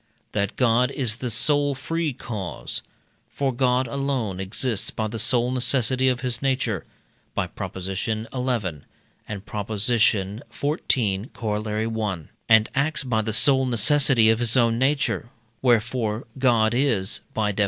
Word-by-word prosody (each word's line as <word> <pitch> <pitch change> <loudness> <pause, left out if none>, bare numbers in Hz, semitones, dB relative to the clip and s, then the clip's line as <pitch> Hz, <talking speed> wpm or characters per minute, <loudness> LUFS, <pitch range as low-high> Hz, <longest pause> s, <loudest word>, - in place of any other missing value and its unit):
That 100 -1 -1
God 125 0 +3
is 125 -5 -1
the 125 -2 -4
sole 145 +5 +2
free 165 +3 -2
cause. 105 -8 -5 0.5
For 135 -2 -1
God 125 0 +1
alone 130 -7 -2
exists 105 +3 -1
by 110 - -3
the 110 +1 -5
sole 120 +2 +2
necessity 130 0 +2
of 125 -1 -1
his 125 -2 -2
nature 130 -8 -1 0.5
(by - - 0
Prop. - - -7
xi. 95 +4 -3
and 110 0 -2
Prop. 105 - -5
xiv., 110 - 0
Coroll. 110 0 -2
i.), 95 -7 -3 0.2
and 110 -1 +6
acts 140 +2 0
by 115 -4 0
the 110 0 -3
sole 130 +2 +4
necessity 125 -2 +4
of 110 - 0
his 120 +1 +2
own 115 -1 +3
nature, 135 -3 0 0.3
wherefore 120 -2 +1
God 120 -4 +3
is 120 -7 +1 0.2
(by 105 -1 +1
Def. 100 - -6
120 Hz, 140 wpm, -24 LUFS, 110-130 Hz, 0.5 s, and